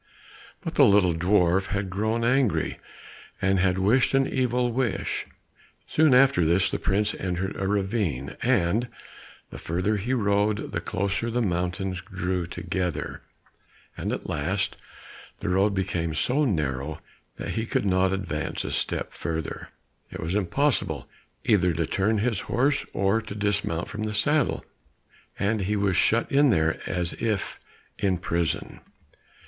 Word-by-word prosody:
But - - -4
the - - +5
little 100 -4 +5
dwarf 90 +2 +2
had 100 -1 -2
grown 110 +4 0
angry, 125 -2 +1 0.6
and 95 0 +2
had 90 0 +2
wished 115 +8 +3
an 135 0 +4
evil 125 -1 0
wish. 120 -3 -1 0.6
Soon 155 -4 +4
after 130 -8 +5
this 85 +4 +3
the - - -2
prince 105 +2 +1
entered 95 +1 -3
a 95 - -2
ravine, 95 - -1
and 105 +8 +2 0.6
the - - -8
further 90 +6 0
he 120 +7 -1
rode 105 -1 +1
the - - -2
closer 100 +5 -1
the 120 +1 0
mountains 90 0 -2
drew 90 -2 -3
together, 90 -3 -3 0.7
and - - -3
at - - -4
last 95 +8 -1 0.6
the - - -3
road 100 +2 +2
became 85 -4 -1
so 145 +4 +2
narrow 75 - -1 0.4
that - - -6
he 110 0 -2
could - - 0
not 95 -1 +3
advance 95 -2 -3
a - - -3
step - - -2
further; 80 -1 -4 0.4
it - - -8
was 80 +2 -3
impossible 105 +8 0 0.4
either 90 -6 +3
to 80 +1 0
turn 105 +7 +1
his 110 -2 0
horse 140 +4 +1
or 100 +4 +2
to 105 -2 -8
dismount 105 -5 -1
from 105 - -6
the 110 0 -2
saddle, 150 +7 +1 0.7
and 105 +1 0
he 100 +3 0
was 100 -2 +1
shut 115 +6 +2
in 140 +1 +5
there 80 -6 +2
as 90 -3 -1
if 110 -4 -1 0.4
in 95 -2 +1
prison. 85 -3 -2
100 Hz, 145 wpm, -26 LUFS, 90-110 Hz, 0.7 s, the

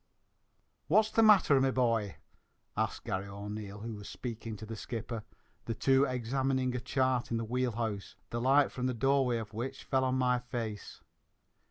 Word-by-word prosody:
"What's 215 +6 +4
the 225 - +4
matther, 195 -11 +6
me 135 - +3
bhoy?" 115 -6 +1 0.6
asked - - -1
Garry 95 +1 -3
O'Neil, 100 0 -6
who 115 +1 -5
was 105 -1 -8
speaking 115 -2 -6
to 110 - -8
the 115 +1 -6
skipper, 115 0 -5 0.4
the 115 - -2
two 135 +3 +4
examining 130 +1 0
a - - 0
chart 130 0 0
in 115 - 0
the 115 - -2
wheel 125 +1 0
house, 110 -3 -3 0.2
the 120 - -2
light 135 +3 +4
from 125 0 -2
the 125 - -1
doorway 135 0 +2
of 110 -2 -6
which 120 +5 -4
fell 130 -1 +1
on 130 0 +1
my 125 -1 +2
face. 115 -4 -5
125 Hz, 175 wpm, -32 LUFS, 110-130 Hz, 0.6 s, matther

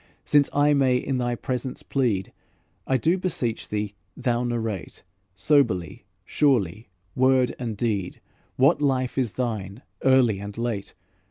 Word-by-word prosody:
Since 145 -1 +4
I 145 +1 +3
may 130 -3 +3
in 130 +1 -2
thy 120 -1 0
presence 125 +1 -4
plead, 115 -9 -1 0.5
I 130 - +3
do 165 +9 +1
beseech 130 -11 -2
thee 105 -1 -2 0.2
thou 120 -1 0
narrate, 115 -6 -4 0.3
Soberly, 100 - +1 0.2
surely, 110 - +1 0.2
word 130 0 +3
and 115 -4 -4
deed, 100 -5 -2 0.4
What 135 +3 +4
life 130 -3 +1
is 120 -5 -1
thine, 110 -3 -4 0.2
early 130 -6 +4
and 100 +1 -7
late? 115 -4 -3
120 Hz, 135 wpm, -25 LUFS, 105-130 Hz, 0.5 s, Since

